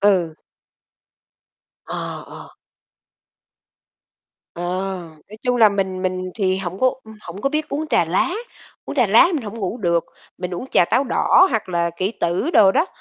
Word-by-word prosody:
Ừ. 185 -6 +2 1.5
Ờ, - - -5
ờ. - - -12 2.0
Ờ, 175 - -6 0.7
nói 215 - -11
chung 250 -1 +1
là 225 -3 +7
mình 190 -2 -2
mình 185 0 -2
thì 190 -3 +1
hổng 190 -1 -5
có 260 - +4 0.2
u 220 - -13
hổng 180 +1 -9
có 275 - +1
biết 305 0 -2
uống 305 +2 -3
trà - - +3
lá, 185 - 0 0.5
uống - - -7
trà 250 -4 +4
lá 225 - +6
mình 285 - -2
hổng 215 +2 -7
ngủ 200 +1 -3
được, 170 -5 +1 0.3
mình 180 0 -4
uống 175 - -5
trà - - +5
táo 260 +9 +1
đỏ 370 - +4
hoặc 220 -5 -1
là 170 -1 0
kỷ 190 +4 -1
tử 180 - -1
đồ 195 - +6
đó, 340 - +2
195 Hz, 170 wpm, -21 LUFS, 180-240 Hz, 2.0 s, là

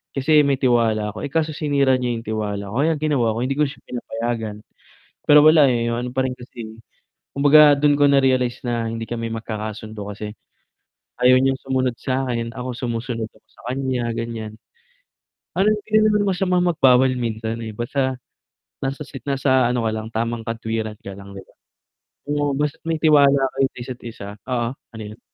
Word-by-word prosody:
kasi 150 +3 +4
may 140 - +3
tiwala 115 -4 +2
ako. - - -8
Eh, 140 - -6
kaso 160 -1 +1
sinira 140 -3 +2
niya 120 -1 -1
'yong 115 - -6
tiwala 105 -2 -3
ko. 120 - -2
Kaya 165 +1 +3
ang 150 - -8
ginawa 125 -7 +2
ko, - - -3
hindi 135 - -1
ko 150 - +4
na - - -6
siya - - -23
pinapayagan. 115 -3 -3 0.7
Pero 150 0 +8
wala, 155 -3 +7
eh, 115 -1 0
'yong 115 - -1
ano - - -4
pa 130 - +1
rin 125 - -4
kasi 115 -2 -10 0.6
kumbaga, 145 +1 +6
do'n 145 0 +3
ko 145 - +6
na-realize 130 -3 +2
na 115 -2 -1
hindi 115 0 -4
kami 115 -1 -4
magkakasundo, 110 -2 -6
kasi, 105 0 -7 0.9
ayaw 125 +1 +7
niyang 135 0 +1
sumunod 130 -2 0
sa'kin. 125 -3 -2
Ako, 125 0 -4
sumusunod 115 -2 -3
ako - - -27
sa - - -20
kaniya, 130 -3 -2
ganiyan. 115 -2 -5 1.0
Parang 210 +3 +4
hindi 210 0 -7
naman 210 -1 +3
masamang 180 -1 +1
magbawal 130 -5 +4
minsan, 115 -1 -3
eh, 110 - -5
basta, 130 +3 -1 0.7
nasa 135 +2 -3
sit 135 -2 -10
nasa 130 -2 +2
ano 125 -1 -1
ka 110 - +1
lang, 110 0 -4
tamang 115 0 -2
katwiran 110 -1 -3
ka 100 - -8
lang, 100 0 -11
'di 95 - -8
ba. - - -25 0.8
Oo, 145 -1 0
basta 150 +1 -1
may 165 0 0
tiwala 145 -3 +5 0.2
kayo 135 - +3
isa't 125 0 -7
isa 105 -3 -8
oo, 120 -2 -1
ano 115 -4 -12
'yon? 105 +2 -10
125 Hz, 180 wpm, -21 LUFS, 115-140 Hz, 1.0 s, Pero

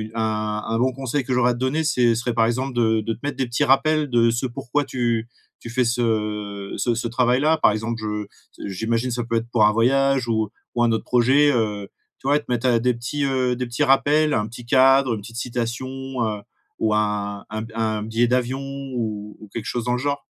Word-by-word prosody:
un 110 -1 -1
un 115 - -1
bon 130 +1 +2
conseil 135 +1 -2
que 130 - -1
j'aurais 125 0 +3
te 120 - -7
donner, 130 +5 0
c'est 125 -6 +3
serait, 120 +1 -2
par 115 -1 +3
exemple, 130 +3 -1
de 110 -2 +2
de 115 +2 -2
te - - -12
mettre 145 -1 -2
des 135 - 0
petits 120 +5 0
rappels 150 +3 +3
de 120 -1 +4
ce 120 +3 -1
pourquoi 125 +3 -2
tu 120 -3 -1 0.3
tu 115 - -9
fais 125 +2 +1
ce, 120 +1 0
heu, 105 -3 -2
ce 120 -1 0
ce 115 +1 -2
travail-là. 125 +6 +2
Par - - +4
exemple, 115 +2 -3
je 105 -1 -3 0.4
j'imagine, 115 +5 -1
ça 120 0 -2
peut 115 - -2
être 115 +1 -1
pour 110 -3 +4
un 105 - +4
voyage 135 +2 +2
ou 110 -2 0 0.3
ou 120 - +2
un 120 - +3
autre 110 - -1
projet, 130 +4 +4
heu, 105 -5 -1 0.3
tu - - -7
vois, 145 +1 +4
te - - -15
mettre 120 0 +2
des 125 +2 +2
petits, 120 +5 -3
heu, 130 -2 +1
des 125 +1 -3
petits 120 +5 -1
rappels, 145 +2 +3
un 105 - 0
petit 120 +2 -10
cadre, 135 0 +4
une 105 - -7
petite 115 +3 -10
citation, 120 +1 -3 0.4
heu, 105 -2 -3 0.4
ou 110 -1 +1
un 105 -1 -1
un 110 +1 -4
b 115 - -10
un 110 -2 -1
billet 115 +2 +1
d'avion 125 +2 0
ou 125 -7 -5
ou 105 - -12
quelque 115 -2 -5
chose 120 - -2
dans 125 +1 0
le - - +1
genre. 140 +1 -2
120 Hz, 225 wpm, -22 LUFS, 110-130 Hz, 0.4 s, de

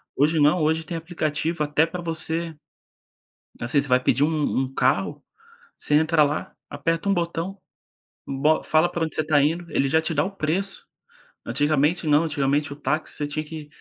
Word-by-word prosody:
Hoje 155 +3 +2
não, 150 +4 +4
hoje 160 +1 +1
tem 170 - -5
aplicativo 160 -1 -2
até 150 +2 +2
pra 175 +1 -6
você 165 0 -3 1.1
assim, 120 +4 +1
você 140 - -5
vai 125 0 +4
pedir 125 +2 +1
um 160 - +1 0.3
um 130 - -7
carro, - - 0 0.5
você 150 - -1
entra 160 0 +4
lá, 145 +1 -3 0.2
aperta 165 +6 -1
um 200 - +4
botão, 170 +2 -2 0.7
bo 145 +3 +1
fala 160 +3 +3
pra 170 -2 -1
onde 160 - -5
você 155 - 0
tá 150 -2 +3
indo, 165 +4 0
ele 135 - +1
já 160 +3 +3
te 160 +1 -2
dá 150 - +2
o 190 - -3
preço. 190 +6 -2 0.6
Antigamente 150 +6 +1
não, 150 +2 +4
antigamente 145 0 0
o - - -11
táxi, 155 +1 -2
você 145 - -2
tinha 155 +1 -3
que 155 -1 -8
155 Hz, 185 wpm, -24 LUFS, 145-165 Hz, 1.1 s, não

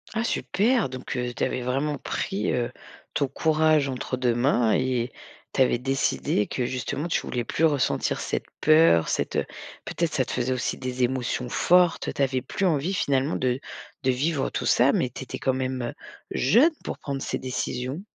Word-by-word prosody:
Ah 220 - +1
super! 235 - +1
Donc 130 0 -6
heu, 125 0 -2
tu - - -2
avais 130 - -1
vraiment 135 +4 -1
pris, 195 0 -2
heu, 120 -1 -1 0.4
ton 140 - +1
courage 155 0 +2
entre 130 0 -3
2 125 -2 +2
mains 120 -2 +2
et 125 -1 0 0.4
tu - - +1
avais 130 - +4
décidé 130 -4 0
que, 125 - -2
justement, 130 +5 -3
tu 170 - 0
voulais 120 -1 -3
plus 160 +7 +1
ressentir 145 -4 +1
cette - - -2 0.2
peur, 155 - +5
cette, - - -1
heu - - +1 0.4
peut-être 170 -2 -1
ça 130 - +1
te - - -6
faisait 125 +1 0
aussi 125 - -2
des 130 -1 -2
émotions 125 0 -1
fortes. 180 +5 +3
Tu - - -3
avais 130 -1 0
plus 190 - -2
envie, 165 +1 +1
finalement, 140 -1 +1
de 130 0 0 0.4
de 130 - +3
vivre 140 +2 0
tout - - -3
ça - - +4
mais - - +1
tu - - -7
étais - - -6
quand 130 - +1
même, 130 0 -2
heu, 120 - -3 0.4
jeune 240 - +4
pour - - -4
prendre 140 -1 -4
ces - - -2
décisions? 130 +3 -3
130 Hz, 190 wpm, -25 LUFS, 125-155 Hz, 0.4 s, peur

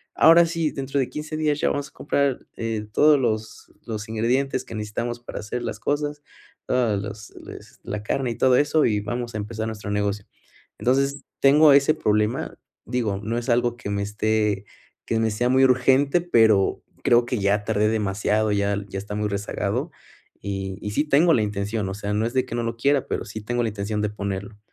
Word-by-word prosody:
Ahora 170 +1 +7
sí, 165 -2 -1
dentro 135 0 -2
de 130 - 0
15 155 +1 -5
días 150 -1 0
ya - - +2
vamos 145 0 -2
a - - -32
comprar, 140 -2 -1
eh, 115 -2 -3
todos 150 +5 +5
los 110 -3 -3
los 110 -2 -5
ingredientes 125 +4 0
que - - -8
necesitamos 115 +3 -4
para 120 - -7
hacer 115 +3 -4
las - - -4
cosas, 145 0 -2 0.5
todos 115 -6 +1
los 105 +1 -8
les - - -12
la 105 0 -5
carne 130 +3 -1
y - - -4
todo 130 -1 +4
eso, 150 +1 +3
y 105 -3 +1
vamos 120 +2 -4
a - - -1
empezar 110 +1 -4
nuestro 105 -2 -6
negocio". 100 0 -1 0.5
Entonces, 135 +3 +1 0.2
tengo 145 +2 +7
ese 140 +2 +5
problema, 105 -3 0 0.3
digo, 115 -5 -1
no 115 +3 -2
es 120 - -4
algo 120 0 +2
que 110 - -6
me 100 0 -1
esté 105 -1 0 0.4
que 115 - 0
me 110 -1 +1
sea 120 +4 0
muy 130 +1 +4
urgente, 130 +4 +3
pero 110 - +3 0.2
creo 120 0 +4
que 120 0 -2
ya 100 +1 +1
tardé 105 -1 +1
demasiado, 105 0 0
y 100 - +1
ya 100 0 +1
ya 95 - -4
está 105 +1 -6
muy 105 0 -1
rezagado. 100 +1 -2 0.5
Y 95 -1 -4
y 105 - -4
sí, 145 +8 +1
tengo 160 +4 +5
la 115 - +3
intención, 105 0 -2
o 95 - -4
sea, 105 0 -3
no 105 +2 +1
es 120 - -6
de 130 - +1
que - - -6
no 120 - -1
lo 115 0 -3
quiera, 140 +3 +1
pero - - -2
sí 110 0 -7
tengo 120 +3 -1
la 115 - 0
intención 105 0 -3
de 105 - 0
ponerlo. 100 0 -5
115 Hz, 205 wpm, -24 LUFS, 105-130 Hz, 0.5 s, Ahora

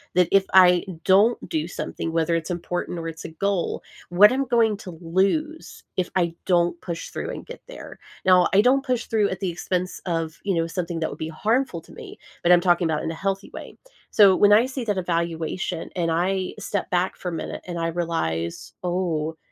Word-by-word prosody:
that 180 -1 +4
if 195 -1 +4
I 180 -2 +6 0.2
don't 205 +5 +4
do 160 -1 -2
something, 165 -1 -5
whether 165 +1 +1
it's 165 +1 -3
important 175 0 -3
or 165 0 -5
it's 165 0 -7
a - - -6
goal, 185 +2 -2 0.3
what 200 +6 +7
I'm 270 +1 0
going 230 -3 +2
to 190 -2 -9
lose 200 - -1
if 180 -1 -1
I 170 -2 +1
don't 175 -1 +2
push 170 -2 -5
through - - -5
and - - -7
get - - -10
there. - - -10 0.3
Now 185 -1 +6
I 195 - +5
don't 260 +4 +3
push 250 -3 -1
through 215 -3 +1
at 185 - -4
the 190 -2 -1
expense 180 +1 -3
of, 165 -2 -2
you 195 -2 0
know, 165 0 +1
something 170 0 -4
that 160 - 0
would - - -9
be 160 - -3
harmful 210 +3 -1
to - - -18
me, - - -10 0.2
but 175 - +3
I'm 175 -1 +7
talking 175 -1 +3
about 155 -1 -1
in 160 - -2
a - - -5
healthy 195 +3 -3
way. - - -9 0.3
So 200 -3 +6
when 205 +2 +5
I 215 +4 +6
see 265 -1 -5
that 205 -3 -1
evaluation 170 -1 -2
and 170 -2 0
I 185 +3 -1
step 200 - -3
back 180 +1 0
for 180 - -5
a - - -6
minute 165 - -5
and 175 -1 -4
I 165 - 0
realize, 120 - -3
"Oh, 165 -3 -1
180 Hz, 210 wpm, -24 LUFS, 165-195 Hz, 0.3 s, what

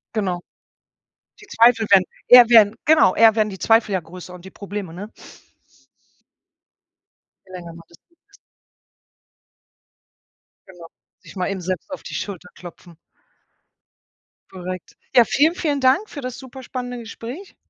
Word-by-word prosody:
Genau. 185 -5 -2 1.0
Die 420 - -15
Zweifel 230 - +3
werden 195 -2 +6 0.2
eher 245 -1 +8
werden 220 -2 +6
genau, 300 -12 +4
eher 225 0 +5
werden 215 -1 +1
die 190 - -10
Zweifel 225 -1 +2
ja 190 - 0
größer 180 +2 -12
und 180 -1 -13
die 190 - -11
Probleme, 200 -4 -8
ne? 200 +5 -9 2.4
Je - - -17
länger 175 -2 -9
man 165 0 -14
das 170 - -21
liegen 340 - -37
lässt. 400 - -22 2.3
Genau, 175 -3 -14 0.3
sich - - -16
mal 180 -1 -2
eben 195 -1 -5
selbst 185 - -5
auf 280 - -7
die - - -8
Schulter 180 -3 -7
klopfen. 175 0 -14 1.5
Korrekt. 185 -1 -8 0.2
Ja, 245 - +8
vielen, 295 +10 +2
vielen 290 -6 -2
Dank 265 +12 +2
für 285 - -8
das 255 -1 -6
superspannende 255 -1 -8
Gespräch. 235 - -10
210 Hz, 140 wpm, -20 LUFS, 185-250 Hz, 2.4 s, eher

